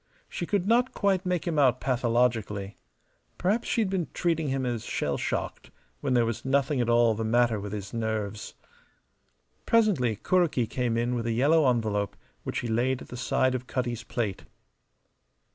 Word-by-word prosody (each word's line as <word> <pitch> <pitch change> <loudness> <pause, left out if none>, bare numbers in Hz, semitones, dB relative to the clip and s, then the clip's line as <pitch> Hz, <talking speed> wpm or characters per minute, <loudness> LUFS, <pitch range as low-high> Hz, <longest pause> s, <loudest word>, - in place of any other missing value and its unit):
She 175 - -5
could 200 -3 0
not 245 +3 +2
quite 190 -2 +1
make 180 -2 0
him 160 -3 0
out 130 -3 +4
pathologically. 115 -5 0 0.6
Perhaps 205 +6 0
she 230 - +1
had 205 - 0
been 185 -4 -1
treating 165 -3 0
him 135 -1 -1
as 120 -3 -2
shell - - -2
shocked - - -3 0.3
when 135 -3 0
there 120 -1 +4
was 115 -1 -3
nothing 140 0 +1
at 120 - 0
all 120 -1 +4
the 110 +1 -3
matter 115 0 +2
with 100 0 -6
his 100 -1 -6
nerves. 110 -2 -3 1.1
Presently 190 - +3
Kuroki 170 - +1
came 120 0 -1
in 120 +1 0
with 120 -1 -2
a 115 - 0
yellow 145 +4 +4
envelope, 110 -4 -1 0.2
which - - -3
he 120 - -4
laid 120 +3 0
at - - -15
the - - -7
side 130 +1 +1
of 130 0 -4
Cutty's 120 -2 -2
plate. 110 -4 -3
125 Hz, 175 wpm, -27 LUFS, 115-150 Hz, 1.1 s, out